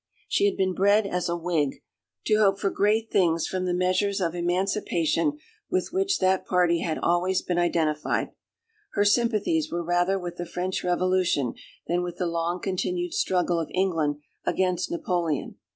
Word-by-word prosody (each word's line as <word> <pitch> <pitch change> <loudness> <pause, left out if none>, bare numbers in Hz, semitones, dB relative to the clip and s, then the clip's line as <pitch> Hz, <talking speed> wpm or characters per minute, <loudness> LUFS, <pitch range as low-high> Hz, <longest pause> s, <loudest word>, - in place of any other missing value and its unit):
She 400 - +2
had 405 - +1
been 190 -1 +1
bred 200 +3 +3
as 180 -3 -2
a 170 - -1
Whig, 165 -5 -1 0.4
to 215 - +3
hope 195 -2 +4
for 195 -2 0
great 220 +2 +1
things 170 -4 +2
from 185 -1 -2
the 180 - 0
measures 185 +2 +1
of 170 -3 -1
emancipation 180 - 0 0.3
with 370 +1 0
which 390 +1 +1
that 185 0 +2
party 175 -2 +3
had 160 -2 -2
always 180 +2 +1
been 175 -1 -1
identified. 160 -3 0 0.6
Her 205 -1 +2
sympathies 235 +8 +2
were 170 0 -2
rather 175 +3 +1
with 175 -2 -6
the 175 - -4
French 180 +2 -3
Revolution 180 -7 +1 0.3
than 175 +1 0
with 175 -1 -5
the 180 - -1
long 170 +1 -1
continued 350 - -2
struggle 180 - +1
of 165 - -3
England 165 -6 +1 0.3
against 185 -2 0
Napoleon. 180 - -2
180 Hz, 165 wpm, -26 LUFS, 175-200 Hz, 0.6 s, hope